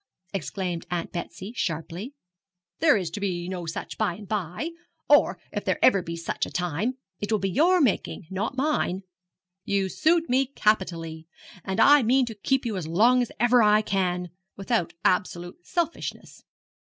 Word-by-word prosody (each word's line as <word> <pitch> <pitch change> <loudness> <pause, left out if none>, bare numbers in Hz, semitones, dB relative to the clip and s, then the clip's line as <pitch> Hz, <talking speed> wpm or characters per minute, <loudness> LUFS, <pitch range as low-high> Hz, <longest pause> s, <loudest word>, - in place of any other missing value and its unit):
exclaimed 175 0 -3
Aunt 175 -1 -3
Betsy, 185 +4 -6
sharply; 175 - -4 0.6
'there 305 -7 +5
is 180 -4 -3
to 190 - -5
be 180 -3 -2
no 180 -2 -5
such 160 - -6
by 175 - +1
and 205 +1 -11
by; 205 - -3 0.4
or, 290 - +4
if - - -3
there - - 0
ever 200 -7 +5
be 170 -1 -5
such 165 0 -3
a - - -10
time, 180 - -1 0.2
it 205 - -4
will 215 - +3
be 195 -1 -2
your 350 - +4
making, 220 - 0
not 215 +8 -3
mine. 260 -10 0 0.6
You 195 -1 0
suit 330 - +2
me 260 +2 +2
capitally, 170 - -1 0.4
and 190 +2 -3
I 290 +3 +7
mean 255 +3 +3
to 230 - -6
keep 260 +6 0
you 220 -4 -2
as 170 -4 -4
long 230 +10 +4
as 245 - -2
ever 240 +1 +5
I 210 0 +5
can, 180 -3 -1 0.3
without 195 -2 -1
absolute 180 - -1
selfishness. 340 -2 -3
200 Hz, 170 wpm, -26 LUFS, 175-250 Hz, 0.6 s, I